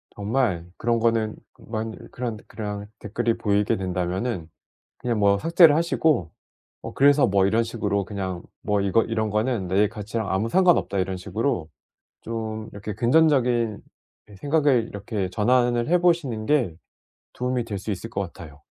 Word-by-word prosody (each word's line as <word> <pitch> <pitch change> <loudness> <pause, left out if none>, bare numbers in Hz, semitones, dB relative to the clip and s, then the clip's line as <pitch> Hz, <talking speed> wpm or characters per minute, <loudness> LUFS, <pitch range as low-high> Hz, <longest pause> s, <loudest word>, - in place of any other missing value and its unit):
정말 105 -5 0
그런 115 0 +1
거는 115 -2 +1 0.2
그만 110 0 -5
그런 120 -3 -4
그런 105 -1 -5
댓글이 115 +2 -1
보이게 105 -1 +1
된다면은 90 +1 -2 0.5
그냥 120 -3 -1
뭐 100 0 +4
삭제를 165 - +6
하시고 160 - +1 0.5
'뭐 - - -7
그래서 145 0 +5
뭐.' 95 -1 +3
이런 115 +3 +2
식으로 105 -4 -1
그냥 95 -3 -4 0.2
'뭐 105 -1 +1
이거 100 +3 +3
이런 110 -2 -1
거는 105 -3 0
내 100 +3 +3
가치랑 110 0 -4
아무 105 +4 0
상관없다.' 175 - +3
이런 95 0 -1
식으로 100 - -2 0.5
좀 110 -1 -5
이렇게 100 +1 -6
긍전적인 120 -3 +2 0.6
생각을 145 -5 +2
이렇게 100 -2 -4
전환을 120 +3 +2
해 180 - +5
보시는 150 -11 +1
게 125 - +1 0.6
도움이 125 -1 -1
될 105 -3 -4
수 105 +3 -4
있을 100 +5 -5
것 100 - -4
같아요. 80 -5 -9
110 Hz, 315 characters per minute, -24 LUFS, 100-120 Hz, 0.6 s, 삭제를